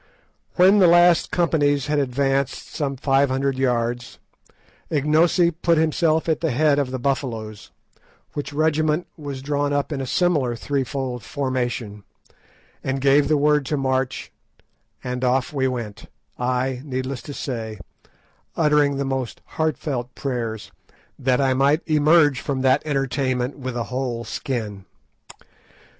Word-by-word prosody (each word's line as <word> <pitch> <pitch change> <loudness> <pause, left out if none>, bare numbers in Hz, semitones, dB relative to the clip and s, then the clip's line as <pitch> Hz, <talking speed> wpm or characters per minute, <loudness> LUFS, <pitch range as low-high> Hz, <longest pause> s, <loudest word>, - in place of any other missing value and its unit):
When 190 +3 +6
the 185 - +6
last 175 0 +5
companies 145 -6 +1
had 150 0 0
advanced 135 0 -1
some 140 -3 -2
five 135 +1 +2
hundred 135 0 -1
yards, 120 -1 -1 0.7
Ignosi 160 +4 +3
put 170 0 +1
himself 160 0 +2
at 160 - 0
the 165 - +1
head 145 +2 +2
of 140 -3 -1
the 130 - -3
Buffaloes, 120 -5 -3 0.6
which 145 - -4
regiment 155 +2 +1
was 140 -4 -7
drawn 145 0 0
up 145 +2 -1
in 140 -3 -2
a 130 - -4
similar 145 -7 +1
three 140 +4 -1
fold 125 -1 -4
formation, 125 -6 -3 0.8
and 135 0 -1
gave 140 +1 +4
the 155 - +3
word 150 0 +3
to 150 - -1
march, 130 -1 -1 0.7
and 125 0 -4
off 130 +2 +1
we 135 -2 +1
went, 115 -4 -5 0.3
I, 125 +1 -1
needless 130 -2 -4
to 145 +4 -8
say, 115 -5 -4 0.8
uttering 150 -3 +3
the 140 - -1
most 130 -3 -3
heartfelt 140 -5 -3
prayers 115 -5 -4 0.5
that 125 -1 +1
I 135 -1 +2
might 140 +4 +3
emerge 150 -3 +4
from 135 -2 -3
that 130 +2 +3
entertainment 135 -2 -1
with 130 -2 -4
a 120 - -1
whole 125 -3 -2
skin. 110 -4 -4
135 Hz, 140 wpm, -22 LUFS, 125-150 Hz, 0.8 s, When